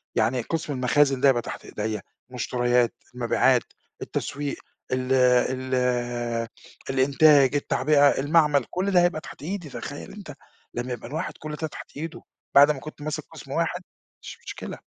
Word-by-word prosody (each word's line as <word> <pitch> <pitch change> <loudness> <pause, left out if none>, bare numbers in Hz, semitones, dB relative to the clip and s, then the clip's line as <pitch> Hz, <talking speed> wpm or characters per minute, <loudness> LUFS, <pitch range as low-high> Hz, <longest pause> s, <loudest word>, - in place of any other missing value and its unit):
يعني 125 +2 +2
قسم 160 +4 -3
المخازن 135 +1 +2
ده 140 - +6
يبقى 120 -3 +3
تحت - - -8
إيديّا، 105 -1 -3 0.3
مُشتريات، 125 -1 +1 0.2
المبيعات، 120 -2 +3 0.4
التسويق، 145 0 -3 0.4
ال 130 0 0
ال 130 0 +3 1.1
الإنتاج، 140 +1 +5
التعبئة، 145 0 +3
المعمل، 145 -2 +3
كلّ 190 +2 -1
ده 180 -2 +5
هيبقى 175 -3 +1
تحت - - -11
إيدي، 175 -1 -4
تخيّل - - -7
أنت - - -9 0.4
لما 125 +1 -3
يبقى 120 - -7
الواحد 160 +5 -3
كلّ 150 0 -5
ده 160 +1 -3
تحت 150 - -11
إيده 160 +2 -6 0.3
بعد 145 +2 +8
ما 145 - -4
كنت 150 +2 -10
ماسك 155 0 -3
قِسم - - -11
واحد، - - -1 0.4
مش - - -9
مشكلة. - - -7
140 Hz, 150 wpm, -25 LUFS, 125-150 Hz, 1.1 s, بعد